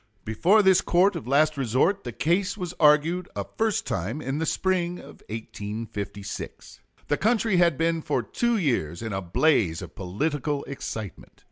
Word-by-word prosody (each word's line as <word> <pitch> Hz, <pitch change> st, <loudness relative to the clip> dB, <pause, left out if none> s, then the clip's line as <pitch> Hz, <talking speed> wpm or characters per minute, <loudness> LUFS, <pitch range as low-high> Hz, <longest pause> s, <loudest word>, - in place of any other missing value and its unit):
Before 175 Hz, -, +3 dB
this 190 Hz, -1 st, +5 dB
court 185 Hz, +3 st, +3 dB
of 150 Hz, -8 st, -6 dB
last 150 Hz, +3 st, +3 dB
resort 135 Hz, -, +1 dB
the 120 Hz, -, -4 dB
case 185 Hz, -, 0 dB
was 180 Hz, -3 st, -4 dB
argued 160 Hz, +4 st, +4 dB
a -, -, -3 dB
first 220 Hz, -2 st, 0 dB
time 115 Hz, -, -3 dB
in 135 Hz, 0 st, -3 dB
the 160 Hz, -, -1 dB
spring 180 Hz, -1 st, 0 dB
of -, -, -13 dB
1856. 105 Hz, -2 st, -6 dB, 0.3 s
The 145 Hz, -, +1 dB
country 220 Hz, -2 st, +2 dB
had 170 Hz, -5 st, +4 dB
been 165 Hz, 0 st, +1 dB
for -, -, -1 dB
two 235 Hz, -1 st, 0 dB
years 115 Hz, -, -1 dB
in 110 Hz, -2 st, -4 dB
a 95 Hz, -, -2 dB
blaze 90 Hz, -, +2 dB
of -, -, -9 dB
political 145 Hz, -, -2 dB
excitement. 110 Hz, -7 st, -7 dB
150 Hz, 160 wpm, -26 LUFS, 110-180 Hz, 0.3 s, this